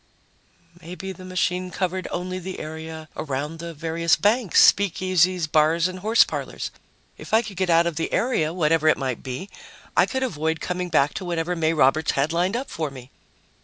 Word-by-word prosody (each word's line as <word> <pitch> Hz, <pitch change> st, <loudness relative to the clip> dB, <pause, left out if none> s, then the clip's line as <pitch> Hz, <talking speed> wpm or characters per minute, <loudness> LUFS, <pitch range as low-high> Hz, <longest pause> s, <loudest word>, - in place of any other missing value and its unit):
Maybe 180 Hz, +3 st, -7 dB
the 185 Hz, 0 st, -11 dB
machine 185 Hz, 0 st, -1 dB
covered 185 Hz, 0 st, -2 dB
only 185 Hz, +1 st, -4 dB
the 185 Hz, +1 st, -6 dB
area 160 Hz, 0 st, -7 dB
around 150 Hz, +3 st, -4 dB
the 170 Hz, 0 st, -6 dB
various 165 Hz, +1 st, +1 dB
banks, 215 Hz, -2 st, +2 dB
speakeasies, 185 Hz, -2 st, +1 dB
bars 160 Hz, +2 st, +3 dB
and 185 Hz, 0 st, -7 dB
horse 220 Hz, +5 st, +5 dB
parlors. -, -, -5 dB, 0.5 s
If -, -, -1 dB
I 225 Hz, -, +4 dB
could 205 Hz, -5 st, -9 dB
get 185 Hz, -1 st, 0 dB
out 170 Hz, 0 st, +5 dB
of 170 Hz, -3 st, -2 dB
the 165 Hz, -, -2 dB
area, 195 Hz, -11 st, +1 dB
whatever 165 Hz, -2 st, +2 dB
it 155 Hz, -, +5 dB
might 130 Hz, -4 st, -3 dB
be, 130 Hz, +8 st, -6 dB, 0.5 s
I -, -, +4 dB
could 265 Hz, -1 st, -2 dB
avoid 160 Hz, -, -1 dB
coming 180 Hz, 0 st, -3 dB
back 145 Hz, -3 st, +2 dB
to 190 Hz, -, -5 dB
whatever 175 Hz, 0 st, -1 dB
May 160 Hz, -1 st, +1 dB
Roberts 155 Hz, +1 st, +3 dB
had 145 Hz, +4 st, 0 dB
lined 180 Hz, +5 st, +1 dB
up 265 Hz, -, -6 dB
for 160 Hz, -3 st, -3 dB
me. 130 Hz, -1 st, -12 dB
170 Hz, 185 wpm, -23 LUFS, 155-185 Hz, 0.5 s, horse